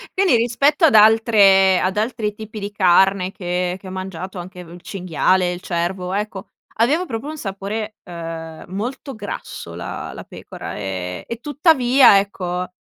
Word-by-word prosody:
Quindi 380 -8 +4
rispetto 280 +8 +2
ad 285 - +4
altre 210 -3 +6
ad 190 +2 -1
altri 215 -1 -1
tipi 215 0 -9
di 205 0 -5
carne 190 -1 +3
che 180 -1 -2
che 190 - -12
ho - - -7
mangiato, 185 0 -6
anche 180 +1 -9
il 175 0 -12
cinghiale, 185 0 0
il 175 0 -6
cervo, 180 +1 -3
ecco, 205 -1 -4 0.3
aveva 290 +11 +2
proprio 235 -3 -5
un 310 +1 -6
sapore, 210 0 -5
uhm, 165 -2 -7
molto 245 +8 -5
grasso 205 -3 -7
la - - -6
la - - -8
pecora, - - -9
e 95 -3 -5
e 235 - -4
tuttavia, 270 - +5
ecco, 180 -2 -3
195 Hz, 155 wpm, -20 LUFS, 180-225 Hz, 0.3 s, altre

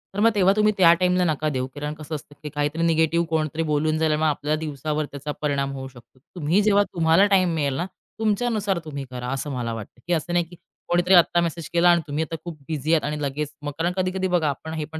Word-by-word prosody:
तर 205 - -2
मग 225 - +6
तेव्हा 195 -1 +4
तुम्ही 215 0 +3
त्या 170 -3 +7
टाईमला 180 +1 +2
नका 155 -1 0
देऊ, 130 -2 -2
कारण 150 +1 -4
कसं 155 +1 -6
असतं, 145 0 -10
की 150 - -4
काहीतरी 150 +3 -1
निगेटिव्ह 165 +1 +2
कोणतरी 160 0 -1
बोलून 155 +1 +1
झाल्यामुळे 155 0 +2
आपल्याला 150 +1 -1
दिवसावर 150 0 -3
त्याचा 145 +1 -5
परिणाम 140 -2 0
होऊ 135 0 -6
शकतो. 125 0 -17 0.2
तुम्ही 175 +5 +2
जेव्हा 205 -1 +4
तुम्हाला 165 +3 +4
टाईम 185 -4 +3
मिळेल 140 -4 0
ना 175 - -1 0.3
तुमच्यानुसार, 215 -3 0
तुम्ही 140 -3 -6
करा 125 -1 -5
असं 140 +2 -4
मला 120 -3 -3
वाटतं. 110 +2 -9
की 175 - +1
असं 170 +1 -1
नाही, 175 -1 +2
की 175 - -14 0.3
कोणीतरी 175 +2 +2
आता 175 0 +5
मेसेज 170 -1 -3
केला 175 +1 +5
आणि 170 -1 +5
तुम्ही 150 +2 -1
आता 165 +1 -5
खूप 170 -3 -7
बिझी 155 0 -1
आहात. 160 - +3
आणि 150 0 -3
लगेच 145 +1 -3
मग 145 0 -4
कारण 170 +2 0
कधी-कधी 185 0 0
बघा, 175 -5 +1
आपण 160 +3 -5
हे 155 -2 -3
पण 160 0 -8
160 Hz, 230 wpm, -24 LUFS, 145-175 Hz, 0.3 s, त्या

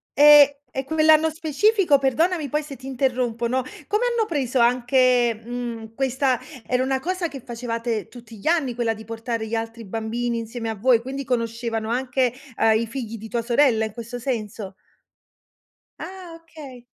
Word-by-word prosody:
Ehm, 295 0 +9 0.3
e 265 - -3
quell'anno 315 +1 +4
specifico 320 +1 +2
perdonami 305 +4 +1
poi 300 +1 0
se 290 -2 -9
ti 260 - -14
interrompo, 250 -3 -1
no, 255 +1 0 0.2
come 425 +4 +1
hanno 450 -2 0
preso 265 -5 -1
anche, 245 0 +3
mhmm, 230 -2 -6
questa 265 -1 +1 0.3
era 255 0 +1
una 265 0 0
cosa 365 +3 -2
che 275 -5 -9
facevate 230 -2 -3
tutti 235 -2 -13
gli 200 - -8
anni, 310 -8 +1
quella 230 -2 0
di 220 0 -11
portare 225 0 -4
gli 230 - -2
altri 225 0 -5
bambini 230 +3 -2
insieme 230 0 -5
a 220 - -3
voi, 235 +3 +4
quindi 270 +2 -5
conoscevano 230 -2 -2
anche, 250 0 0 0.3
uhm, 220 0 +4
i 230 - -1
figli 230 -2 -6
di 220 +2 -9
tua 235 +1 -2
sorella 235 -2 +3
in 215 - -6
questo 235 +2 -7
senso? 215 -5 -4 1.3
Ah, 365 -3 -8
okay. 280 -7 -12
245 Hz, 165 wpm, -23 LUFS, 230-275 Hz, 1.3 s, Ehm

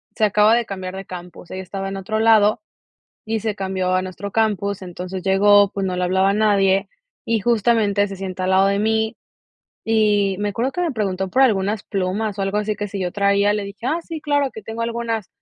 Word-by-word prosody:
se 220 - -1
acaba 210 +2 +4
de 235 -1 0
cambiar 185 -1 -6
de 195 0 -7
campus. 180 -1 -10
Ella 185 0 -5
estaba 195 +1 -5
en 195 - -5
otro 215 +3 -3
lado 220 -2 +4 0.6
y 220 0 -1
se 220 -2 -1
cambió 190 -2 -2
a 185 - +2
nuestro 190 +2 -6
campus. 200 -3 0
Entonces 185 +1 -6
llegó, 200 +1 +5
pues, 195 -1 -2
no 185 -1 -2
le 180 - -1
hablaba 190 +2 +2
a - - 0
nadie 200 -2 +2 0.4
y 225 -2 0
justamente 215 -3 +2
se 195 - -7
sienta 185 -1 -4
al - - 0
lado 190 +1 +4
de 200 0 +1
mí, 220 +1 0 0.7
y 210 -3 +2
me 205 0 -1
acuerdo 240 +6 -1
que 355 - -3
me 335 -5 0
preguntó 190 -4 -2
por 265 +8 +3
algunas 205 -3 +2
plumas 200 +2 -2
o - - 0
algo 195 +1 -1
así, 210 0 -2
que 205 -1 -3
si 195 0 -5
yo 180 -1 -1
traía. 200 0 +2
Le 210 -1 -2
dije: 200 +3 -10
"ah, 320 +5 +1
sí, 325 -2 -7
claro 285 -2 +1
que 220 - -9
tengo 225 +2 -5
algunas". 230 -3 -3
200 Hz, 220 wpm, -21 LUFS, 190-220 Hz, 0.7 s, llegó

